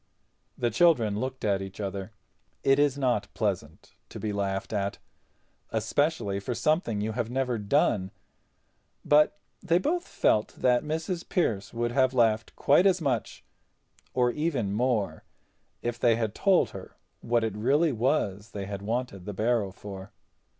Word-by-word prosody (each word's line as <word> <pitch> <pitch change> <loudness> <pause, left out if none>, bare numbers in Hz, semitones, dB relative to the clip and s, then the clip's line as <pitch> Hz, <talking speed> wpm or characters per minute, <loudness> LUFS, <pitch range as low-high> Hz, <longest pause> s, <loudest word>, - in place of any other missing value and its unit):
The 120 -1 0
children 115 -7 +3
looked 130 0 -4
at 100 -2 +1
each 95 +1 -8
other. 100 0 -4 0.5
It 135 +1 +4
is 145 -2 +3
not 125 -6 0
pleasant 95 -8 -3 0.2
to - - -8
be 105 -1 -2
laughed 100 0 -2
at, 100 -1 -1 0.7
especially 120 -10 0
for 115 +5 -4
something 120 - +1
you 110 +1 -1
have 115 0 -2
never 125 -2 -1
done—but 105 - -1 0.2
they 170 -2 +2
both 340 - -1
felt 105 - +1
that 125 -1 +3
Mrs. 160 +3 -3
Pearce 110 - 0
would 120 0 -1
have 130 0 +2
laughed 115 -2 +2
quite 175 +7 +4
as 185 -1 +3
much, 135 -8 -2 0.7
or 125 -1 +3
even 135 -9 -1
more, 110 -8 0 0.6
if 120 0 -2
they 120 -2 +4
had 110 -2 -2
told 195 - +3
her 95 -1 -10 0.2
what 120 -1 +1
it 110 -3 -2
really 140 +9 +2
was 110 -5 -1
they 100 -1 -4
had 100 0 -5
wanted 110 -3 -3
the 105 - -5
barrow 110 -1 +1
for. 100 0 -9
115 Hz, 150 wpm, -28 LUFS, 100-135 Hz, 0.7 s, It